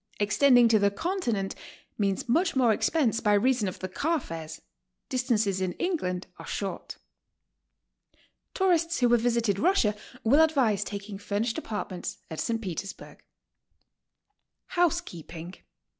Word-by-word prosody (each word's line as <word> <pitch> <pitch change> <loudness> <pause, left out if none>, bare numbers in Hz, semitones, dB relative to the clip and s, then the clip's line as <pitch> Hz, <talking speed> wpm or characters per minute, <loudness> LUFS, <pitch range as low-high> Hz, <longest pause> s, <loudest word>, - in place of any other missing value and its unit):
Extending 245 +4 +5
to 220 -1 +5
the 200 0 +4
Continent 230 - -2 0.4
means 195 0 -1
much 330 +9 +2
more 245 -4 +4
expense 240 -1 +1
by 210 -2 +2
reason 235 +1 +2
of 185 - -4
the 185 - -4
car 315 - 0
fares; 160 - -7 0.5
distances 225 -7 0
in 185 -1 -1
England 190 - -2
are - - -9
short. - - -4 1.6
Tourists 340 -5 +2
who 245 - +4
have 240 -1 +4
visited 230 -4 +1
Russia 230 - +3 0.3
will 275 +8 +5
advise 265 -11 +3
taking 200 0 -7
fur 205 0 -2
nished 230 0 -1
apartments 205 -4 -5
at 160 - -5
St. 230 -1 -1
Petersburg. 195 -1 -7 1.5
HOUSEKEEPING. 180 - -2
225 Hz, 130 wpm, -27 LUFS, 195-280 Hz, 1.6 s, Extending